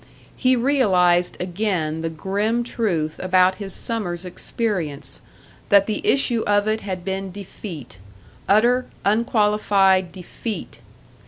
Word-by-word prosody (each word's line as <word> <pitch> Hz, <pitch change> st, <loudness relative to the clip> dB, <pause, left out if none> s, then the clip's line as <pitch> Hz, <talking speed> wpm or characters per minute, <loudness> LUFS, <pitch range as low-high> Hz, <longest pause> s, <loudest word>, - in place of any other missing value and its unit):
He 255 Hz, -1 st, +3 dB
realised 190 Hz, -10 st, +2 dB
again 175 Hz, -4 st, -2 dB
the 165 Hz, -, -2 dB
grim 205 Hz, +8 st, -1 dB
truth 175 Hz, -11 st, -2 dB
about 185 Hz, 0 st, +3 dB
his 195 Hz, -1 st, -4 dB
summer's 185 Hz, -5 st, -2 dB
experience 180 Hz, -5 st, -3 dB, 0.5 s
that 200 Hz, -1 st, +6 dB
the 215 Hz, -1 st, -2 dB
issue 245 Hz, -4 st, +2 dB
of 205 Hz, 0 st, +2 dB
it 220 Hz, 0 st, 0 dB
had 185 Hz, -3 st, -5 dB
been 195 Hz, 0 st, -3 dB
defeat. 175 Hz, -, -9 dB, 0.5 s
Utter, 240 Hz, +5 st, +4 dB, 0.2 s
unqualified 205 Hz, -4 st, +2 dB
defeat! 200 Hz, +4 st, -7 dB
195 Hz, 110 wpm, -22 LUFS, 180-220 Hz, 0.5 s, that